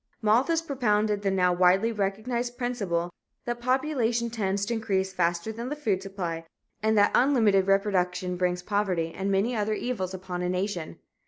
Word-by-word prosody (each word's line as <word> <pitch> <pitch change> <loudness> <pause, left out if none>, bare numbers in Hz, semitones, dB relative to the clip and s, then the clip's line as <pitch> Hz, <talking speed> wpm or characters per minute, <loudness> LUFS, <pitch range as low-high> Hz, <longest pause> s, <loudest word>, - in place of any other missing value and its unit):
Malthus 255 +10 +2
propounded 215 -8 +1
the 200 - +1
now 180 -2 +2
widely 185 +5 +4
recognized 230 +4 -2
principle 200 -9 -2 0.3
that 240 0 -3
population 245 -3 0
tends 200 -3 -1
to 235 - -2
increase 195 -4 -1
faster 175 +3 0
than 235 +3 -5
the 295 - -3
food 215 -11 -1
supply 180 -4 -4 0.4
and 220 0 +2
that 205 0 +5
unlimited 220 -8 +4
reproduction 185 -2 +1
brings 180 0 -1
poverty 185 -5 -1
and 195 +1 -2
many 205 +6 +1
other 215 0 0
evils 195 -6 -3
upon 180 -1 -5
a 180 - -1
nation. 180 -2 -3
205 Hz, 160 wpm, -27 LUFS, 185-235 Hz, 0.4 s, that